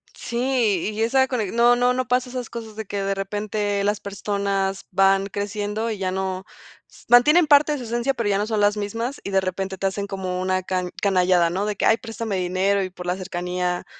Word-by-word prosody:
Sí, 235 -6 0
y 215 - -3
esa 265 +3 +3
cone 225 -7 -2
no 240 +1 +5
no 245 +1 +2
no 255 -1 -2
pasa 250 +1 +1
esas 250 -1 -5
cosas 225 -2 -8
de 220 0 -5
que 200 0 -3
de 195 0 0
repente 205 +1 -2
las 205 +1 0
personas 200 -1 -2
van 195 +1 +3
creciendo, 205 +2 -3
y 215 - -4
ya 185 -1 -1
no 190 0 -3 0.4
s - - -19
mantienen 295 +8 +6
parte 295 +1 +5
de - - -2
su 255 - -7
esencia, 240 +3 -1
pero, 230 -5 -1
ya 200 - +2
no 205 +1 -1
son 220 -1 -1
las 205 +1 +3
mismas, 230 +6 -3
y - - -5
de 195 0 +3
repente 190 +1 -3
te 195 - -3
hacen 200 +1 -3
como 185 -2 -3
una 185 0 0
ca 185 -1 -2
canallada, 180 -3 +3
¿no? 190 +4 -1
De 210 -1 -2
que: - - -1
"Ay 225 - +5
préstame 225 -3 -4
dinero", 185 +2 +1
y 185 - -4
por 180 -1 -10
la 180 0 0
cercanía 180 -1 -3
200 Hz, 225 wpm, -23 LUFS, 190-230 Hz, 0.4 s, mantienen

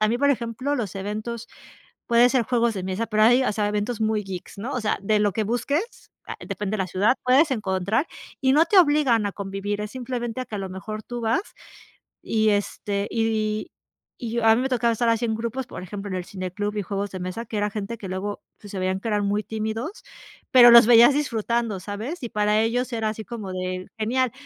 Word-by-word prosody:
a 215 - +3
mí, 240 +2 0
por 285 0 +3
ejemplo 250 +3 -1
los 215 -9 -3
eventos 215 +4 -5 0.6
puede 240 +1 +5
ser 250 -3 +2
juegos 235 -1 +1
de 190 - -4
mesa, 190 +5 -2
pero 215 -1 +1
hay, 245 +3 +5
o - - +1
sea, 210 0 0
eventos 210 +2 -2
muy 220 -1 +1
geeks, 190 0 -8
¿no?, 240 +7 -4
o 250 - -1
sea, 215 - 0
de 210 +1 +2
lo 205 -2 +2
que 220 - -1
busques, 285 - -2 0.2
ah, - - -5
depende 205 0 -3
de - - -2
la 190 - 0
ciudad 200 +8 +2
puedes 275 +5 +4
encontrar 210 - 0 0.3
y 265 0 +3
no 310 +3 +5
te 390 +2 +5
obligan 290 - +4
a 200 - -3
convivir, 200 +1 -4
es 210 0 -4
simplemente 245 -1 -4
a - - -3
que 215 - -8
a - - -4
lo 190 -1 -4
mejor 215 +3 -6
tú 240 +2 -6
vas, 230 - +1 0.8
y 220 -1 +1
este 205 0 -1
y 215 -1 -1 0.5
y 235 -3 -5
yo 235 -1 0
a 220 0 +7
mí 245 - 0
me 265 - -1
tocaba 235 -2 +2
estar 235 +1 +1
así 230 +1 +1
en 220 -1 -1
grupos, 235 +3 -4
por 180 - -8
ejemplo, 200 +2 -6
en 185 - -3
el 180 - -3
cine 185 -1 -5
club 205 +3 -3
y - - 0
juegos 200 +1 -3
de 185 - -6
mesa, 185 +6 -4
que 215 - -5
era 210 0 0
gente 210 +2 -5
que 195 - -8
luego 190 +2 -4 0.2
pues 205 - -11
se 195 - -4
veían 185 +1 -1
que 225 - -3
eran 205 -1 +1
muy 205 +1 0
tímidos, 225 - -4 0.5
pero 240 -2 +9
los 235 -1 +9
veías 240 +3 +8
disfrutando, 235 -7 -1
¿sabes?, 230 +10 -6
y 235 - -3
para 210 +1 +2
ellos 245 +2 -1
era 220 -1 0
así 220 0 -6
como 215 -5 -6
de: 185 0 -4
"Genial." 250 +3 +1
220 Hz, 235 wpm, -24 LUFS, 205-240 Hz, 0.8 s, pero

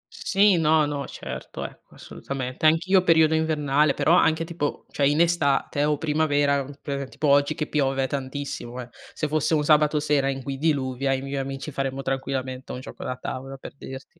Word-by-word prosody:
Sì, 200 -1 +3
no, 155 -1 +4
no, 145 -1 -3
certo, - - -7
ecco, - - -12
assolutamente. 130 +1 -5
Anch'io 180 +4 +4
periodo 160 -2 +4
invernale, 150 -2 +2
però 165 - +3
anche 165 -1 +3
tipo 165 -3 -4
cioè 140 - +2
in 145 +2 +2
estate 145 -4 +1
o 150 0 +1
primavera, 145 -2 +1
ehm, 140 +1 -7
per 140 -2 -4
tipo 150 - -2
oggi 145 +2 +3
che 155 - -2
piove 135 -2 +1
tantissimo 130 -2 -5
eh. 120 - -10 0.2
Se 155 - -2
fosse 155 +1 0
un 150 - +1
sabato 150 0 +4
sera 145 -2 +1
in 135 -1 -4
cui 135 +1 -4
diluvia 135 -3 0
io - - +2
e - - -3
i - - -8
miei 140 0 -4
amici 135 +2 -5
faremmo 135 0 -3
tranquillamente 130 -1 -3
un - - -5
gioco 130 - -9
da 125 - -3
tavola, 135 +1 -6
per - - -10
dirti. 135 +4 -10
145 Hz, 195 wpm, -24 LUFS, 135-155 Hz, 0.2 s, no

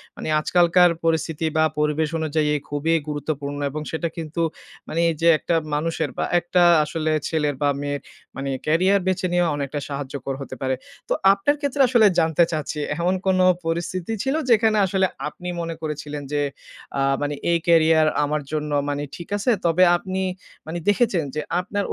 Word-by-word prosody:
মানি - - -6
আজকালকার 175 +2 +4
পরিস্থিতি 160 -1 0
বা 155 - +4 0.2
পরিবেশ 150 +1 +1
অনুযায়ী 155 -1 0
এ - - +2
খুবই 145 +3 0
গুরুত্বপূর্ণ 145 -1 -4
এবং 155 +2 -5
সেটা 165 +1 -2
কিন্তু 165 0 -4 0.5
মানি 165 - -1
এই - - -5
যে 170 - +3
একটা 170 - 0 0.2
মানুষের 160 0 -1
বা - - 0
একটা 175 +1 +1 0.2
আসলে 155 +1 -2 0.2
ছেলের 150 -3 0
বা 145 - +3
মেয়ের 145 0 -3 0.3
মানি 135 0 -4 0.2
ক্যারিয়ার 185 +5 +3
বেছে 185 0 0
নেয়াও 175 -1 +2
অনেকটা 145 0 -3
সাহায্যকর 140 -1 -5
হতে 135 - -7
পারে। 130 0 0 0.3
তো - - +3 0.2
আপনার 245 +9 +1
ক্ষেত্রে 285 -1 0
আসলে 240 -3 +5
জানতে 160 +1 +3
চাচ্ছি 155 -1 -3 0.2
এমন 175 +2 +1
কোনো 185 -1 +4 0.2
পরিস্থিতি 170 +4 -2
ছিল 270 +2 0
যেখানে 220 -2 +4
আসলে 190 0 +1 0.2
আপনি 180 +4 -8
মনে 165 0 -4
করেছিলেন 150 -1 -5
যে 145 0 0 0.6
আ - - +2 0.2
মানি 145 0 -1 0.2
এই 170 - +4
ক্যারিয়ার 160 -1 +5 0.2
আমার 150 +1 -1
জন্য 150 -1 -2 0.2
মানি 145 0 -2
ঠিক 170 - -10
আছে। 205 +5 +1
তবে 170 +2 +4
আপনি 190 +1 -4 0.5
মানি 170 +2 -4
দেখেছেন, 205 -5 +2
যে 150 - -1 0.2
আপনার 200 +3 -2
160 Hz, 170 wpm, -23 LUFS, 150-180 Hz, 0.6 s, আসলে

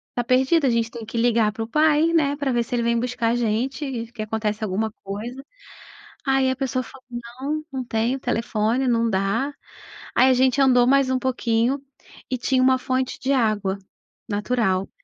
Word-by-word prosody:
tá 245 - 0
perdido, 265 +5 +3
a - - +4
gente 230 -1 +1
tem 235 -2 -8
que 225 +2 -6
ligar 230 -2 +3
para 225 +1 -4
o 225 - -6
pai, 305 +4 +3
né, 290 -3 +2
para 280 -2 -1
ver 240 -1 +1
se 240 - -4
ele 235 - 0
vem 235 0 +1
buscar 245 -1 -1
a - - +1
gente 240 +6 -1
e 235 -4 -5
que 240 -3 -7
acontece 215 0 -2
alguma 215 +2 -1
coisa". 235 +7 -6 0.8
Aí 270 -1 +3
a - - -1
pessoa 255 -1 -2
falou: 260 +1 -14
"Não, 255 +6 -5
não 265 -1 -3
tenho 235 +3 0
telefone, 235 0 0
não 230 -1 +2
dá". 205 +8 0 0.6
Aí, 260 - +5
a - - +6
gente 260 +2 +3
andou 250 -2 +5
mais 270 0 +3
um 260 - +2
pouquinho 250 +1 0 0.5
e 255 - -1
tinha 255 +1 +1
uma 260 0 +4
fonte 255 0 -2
de 270 +2 0
água 210 -6 +1 0.5
natural. 205 -3 0
245 Hz, 190 wpm, -23 LUFS, 225-265 Hz, 0.8 s, a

